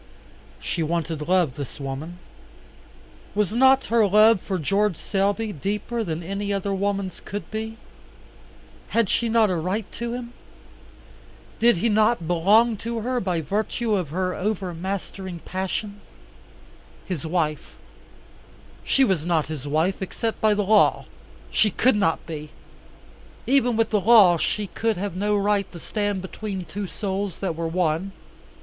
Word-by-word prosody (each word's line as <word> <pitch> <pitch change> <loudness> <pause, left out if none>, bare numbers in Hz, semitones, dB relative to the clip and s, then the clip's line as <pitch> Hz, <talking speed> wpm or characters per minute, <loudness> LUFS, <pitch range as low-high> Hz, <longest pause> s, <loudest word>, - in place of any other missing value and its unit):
She 170 - -3
wanted 160 -1 -2
love, 180 -7 +3
this 140 0 -7
woman. 140 +5 -5 1.2
Was 210 -1 +1
not 265 +2 +5
her 225 -3 +5
love 215 0 +5
for 190 - -2
George 195 +3 +1
Selby 205 +2 -1
deeper 210 - -2
than 165 -3 -4
any 200 +3 -3
other 200 0 -1
woman's 195 -1 -2
could 200 -4 -6
be? 220 +1 -4 1.1
Had 230 -4 +1
she 235 - +1
not 220 -3 +4
a - - 0
right 185 +6 -2
to 235 0 -4
him? 245 -1 -6 1.3
Did 235 -3 +5
he 205 - +1
not 215 -3 +2
belong 205 +7 +4
to 230 +2 -4
her 250 +2 -1
by 180 -6 -1
virtue 215 +6 -1
of 180 -7 0
her 185 +3 -1
overmastering 190 -1 -4
passion? 200 +2 -4 1.0
His 180 -6 -4
wife 160 -2 -2 1.1
she 270 - +3
was 190 - +1
not 160 -4 0
his 145 -3 -5
wife, 160 +7 0
except 225 +4 -3
by 215 -1 +4
the 205 - +1
law. 210 +1 +4 0.5
She 215 - +3
could 245 +5 +2
not 195 -6 +1
be. 155 -2 -7 1.0
Even 250 -3 +2
with 225 -1 +1
the 210 -2 +2
law 200 -5 +7
she 210 +5 -1
could 225 +1 -1
have 200 -1 -3
no 205 +2 +1
right 200 -1 +1
to - - -9
stand 205 +1 -2
between 190 -1 -5
two 205 +2 -5
souls 195 -2 -3
that 185 -4 -2
were 165 0 -2
one. 175 +2 -1
195 Hz, 145 wpm, -24 LUFS, 175-215 Hz, 1.3 s, law